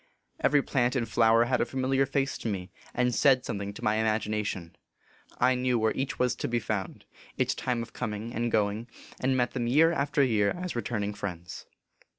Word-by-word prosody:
Every 145 -2 +3
plant 125 -1 +1
and 120 -3 0
flower 115 +1 +4
had 125 0 +1
a - - +2
familiar 135 +1 +1
face 135 0 0
to - - -4
me, 95 -3 -4 0.2
and 125 0 +1
said 130 0 +4
something 100 0 -3
to 120 - -9
my 105 -1 +2
imagination. 105 -5 -1 0.6
I 125 +1 +4
knew 125 -1 +1
where 110 -1 +2
each 135 0 -3
was 125 -1 +2
to - - -2
be 120 - 0
found, 105 -4 -3 0.3
its - - +1
time 120 -2 -2
of - - -12
coming 110 0 -4
and 120 +1 -1
going, 105 +2 0 0.3
and 130 0 +1
met 125 -1 +1
them 120 -2 -2
year 155 +7 +5
after 140 -2 +1
year 105 -6 +2
as 180 -4 -4
returning 105 -3 -2
friends. 90 -4 -6
120 Hz, 190 wpm, -28 LUFS, 105-130 Hz, 0.6 s, year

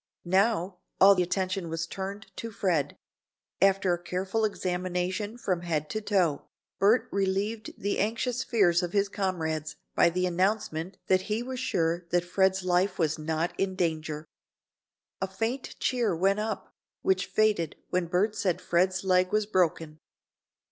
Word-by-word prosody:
Now, 190 -1 +1 0.2
all 195 -1 +7
attention 185 0 -1
was 160 0 -2
turned 195 +4 -7
to 230 - -4
Fred. 185 -8 0 0.6
After 195 -1 +4
a 175 - -3
careful 190 +5 -1
examination 185 +2 -2
from 185 -7 -1
head 155 -3 -2
to 215 - -2
toe, 185 -9 +1 0.3
Bert 210 +5 +4
relieved 200 +3 -1
the 200 +1 -1
anxious 230 +4 0
fears 195 -7 +3
of 175 -1 -4
his 200 -1 +3
comrades 160 -6 -2 0.2
by - - +5
the 180 +2 0
announcement 185 -1 -1
that 185 +2 +1
he 215 +3 0
was 255 0 -5
sure 170 -8 0
that 175 0 +1
Fred's 190 +1 +2
life 185 +2 +1
was 160 -2 0
not 160 +2 -1
in 195 -1 0
danger. 160 -3 -2 1.0
A 190 - 0
faint 225 +7 -3
cheer 240 -8 +1
went 195 +4 +2
up, 215 -1 -4 0.3
which 190 0 +2
faded 210 -8 +1 0.2
when 180 -1 +1
Bert 200 +5 +1
said 185 -5 0
Fred's 185 +2 +1
leg 185 -1 +3
was 215 0 +2
broken. 165 -5 0
185 Hz, 150 wpm, -28 LUFS, 175-205 Hz, 1.0 s, all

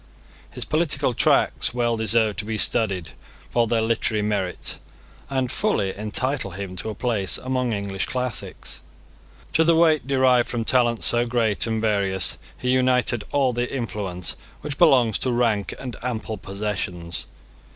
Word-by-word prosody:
His - - -6
political 150 -5 +1
tracts 120 - +2
well 120 -1 +1
deserve 110 -1 +2
to 105 - -3
be 110 0 -2
studied 100 -8 0 0.4
for 120 -1 +2
their 115 0 +1
literary 110 -1 +1
merit, 100 -4 -2 0.5
and 130 -2 -1
fully 100 - 0
entitle 110 +3 -2
him 95 0 -6
to 110 - -3
a 110 - -5
place 110 -7 +1
among 130 -1 -1
English 100 -2 -3
classics. 125 -3 -4 0.7
To 160 - +4
the 165 0 +4
weight 160 -5 +3
derived 130 -3 +3
from 120 -2 -2
talents 120 -2 +3
so 120 0 +2
great 115 -5 +1
and 110 -1 -1
various 100 -4 +1 0.2
he 125 - -1
united 125 -3 +2
all 135 -3 +2
the 120 +1 -2
influence 100 -8 -3 0.3
which 145 -1 -5
belongs 125 - +5
to 130 - +1
rank 115 -4 +1
and 125 -3 -6
ample 110 -3 -4
possessions. 95 -4 -4
115 Hz, 150 wpm, -23 LUFS, 105-125 Hz, 0.7 s, belongs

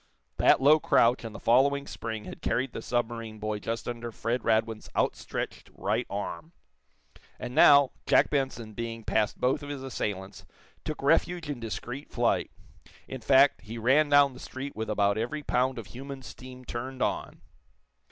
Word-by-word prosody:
That - - +5
low 145 +4 +6
crouch 120 -4 +3
and 115 -1 -7
the - - -7
following 140 +4 +3
spring 110 -5 -5
had - - -9
carried 130 +1 -1
the - - -5
submarine 115 -2 -3
boy 105 0 -3
just 115 +2 -4
under 120 -1 -5
Fred 115 +3 -2
Radwin's 110 -1 0
outstretched - - -2
right - - -1
arm. 105 - -5 0.9
And 120 - -6
now, 140 -1 +7 0.2
Jack - - +4
Benson, 130 -6 -2
being 115 +1 -5
past 110 0 0
both 135 +4 +1
of 145 - -8
his 140 -2 -5
assailants, 100 -7 -4 0.4
took 155 -2 -5
refuge 165 +2 +2
in 135 - -5
discreet 120 +5 -6
flight, - - +1 0.6
in 130 -2 -7
fact, 135 +4 +5
he 115 +2 -8
ran 135 +6 +3
down 145 -1 +5
the 125 - -12
street 135 +2 -7
with 110 0 -4
about 100 0 +2
every 150 +7 -3
pound 130 0 +1
of 115 - -6
human 135 +1 -9
steam 130 0 -11
turned 130 +2 -4
on. - - -3
125 Hz, 165 wpm, -28 LUFS, 115-140 Hz, 0.9 s, now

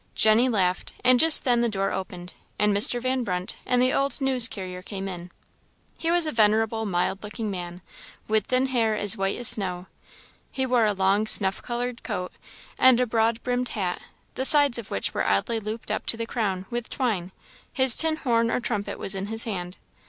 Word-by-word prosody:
Jenny 220 +4 +3
laughed; 185 -5 -1
and 250 0 +4
just 320 +2 +6
then 240 -2 +1
the 235 - 0
door 195 -2 -2
opened, 180 -1 -7 0.2
and 210 -1 +1
Mr. 215 +4 +3
Van 255 +1 -2
Brunt 180 -3 -4
and 250 -1 +1
the 255 +1 +2
old 275 +2 0
news 260 -3 +5
carrier 185 -5 -8
came 195 0 -7
in. 180 -2 -8 0.7
He 330 - -3
was 345 -1 +3
a 310 - -2
venerable, 220 0 +1
mild 185 +1 -2
looking 210 0 -6
man, 175 -1 -8 0.4
with 215 -1 0
thin 255 +1 +1
hair 230 -5 0
as 205 -2 +3
white 195 0 -2
as 245 - +4
snow. 185 -3 +1 0.7
He 265 - -2
wore 245 -3 +2
a 210 - 0
long 195 +2 0
snuff 195 -3 +4
coloured 245 0 -5
coat 200 -6 -5 0.5
and 255 -2 +5
a 250 - +2
broad 230 0 -1
brimmed 250 0 -2
hat, 185 -4 -4 0.3
the 260 - -4
sides 285 -3 +6
of 230 - -9
which 100 - -3
were - - -2
oddly 100 - 0
looped 215 +1 -7
up 215 - -4
to 230 - 0
the 230 - -4
crown, 195 -5 -3
with 240 0 -5
twine; 205 -9 -3 0.4
his 260 -2 +6
tin 320 -1 +2
horn 230 -6 0
or - - -1
trumpet 210 -4 -4
was 195 - -1
in 195 +1 -5
his 225 +1 -2
hand. 180 -4 -6
220 Hz, 200 wpm, -24 LUFS, 195-245 Hz, 0.7 s, just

